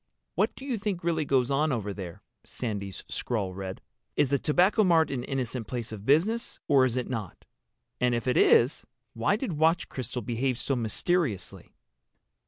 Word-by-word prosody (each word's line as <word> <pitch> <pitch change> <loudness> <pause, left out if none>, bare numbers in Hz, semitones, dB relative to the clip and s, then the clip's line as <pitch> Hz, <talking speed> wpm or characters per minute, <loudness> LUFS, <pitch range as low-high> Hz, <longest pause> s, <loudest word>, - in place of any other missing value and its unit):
"What - - +1
do 265 - -10
you 250 -6 -2
think 195 -4 -3
really 165 -2 0
goes 130 -2 +2
on 150 +3 +2
over 105 -5 -2
there?" 90 -4 -8 0.2
Sandy's 100 -5 -5
scrawl 100 -6 -2
read. 95 0 -6 0.3
"Is 140 - +3
the 140 0 +2
Tobacco 185 - +3
Mart 165 -5 +4
an 125 -3 -2
innocent 125 -4 -3
place 120 -3 -4
of 105 -1 -8
business—or 155 - +2
is 130 -1 -1
it 125 - -1
not? 110 -8 -5 0.5
And 125 -1 +2
if 115 +1 -3
it 125 - +2
is 125 +6 +4 0.3
why 115 - +1
did 215 -4 -3
Watch 160 +3 +2
Crystal 125 -1 -5
behave 120 +3 -1
so 135 - -1
mysteriously?" 120 - -1
130 Hz, 170 wpm, -28 LUFS, 115-160 Hz, 0.5 s, Mart